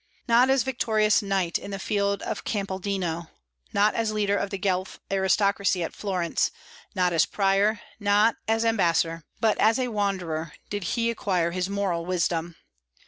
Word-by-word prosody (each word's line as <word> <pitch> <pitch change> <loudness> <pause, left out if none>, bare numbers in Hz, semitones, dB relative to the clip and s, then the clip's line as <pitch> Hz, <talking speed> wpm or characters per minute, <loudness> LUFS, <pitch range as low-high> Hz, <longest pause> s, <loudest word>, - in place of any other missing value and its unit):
"Not 240 +2 +5
as 265 -3 +3
victorious 220 -4 +2
knight 195 -4 0
on - - -7
the 195 - -4
field 200 0 -1
of - - -4
Campaldino, 190 -4 -3 0.4
not 205 +1 +3
as 225 -1 0
leader 205 -1 +1
of 200 - -1
the 195 - -4
Guelph 190 -1 -2
aristocracy 195 -1 +2
at - - -4
Florence, 185 -5 -1 0.5
not 180 -2 +2
as 165 - +3
prior, 200 +1 +2 0.2
not 205 +2 +3
as 225 +1 +1
ambassador," 170 -6 +1
but 220 -2 +2
as 220 +3 +4
a 255 -1 -1
wanderer 180 -7 -2 0.2
did 205 -3 -3
he 235 -1 +1
acquire 180 -7 0
his 180 +1 -2
moral 195 -4 -1
wisdom. 170 -1 -1
200 Hz, 155 wpm, -26 LUFS, 180-215 Hz, 0.5 s, Not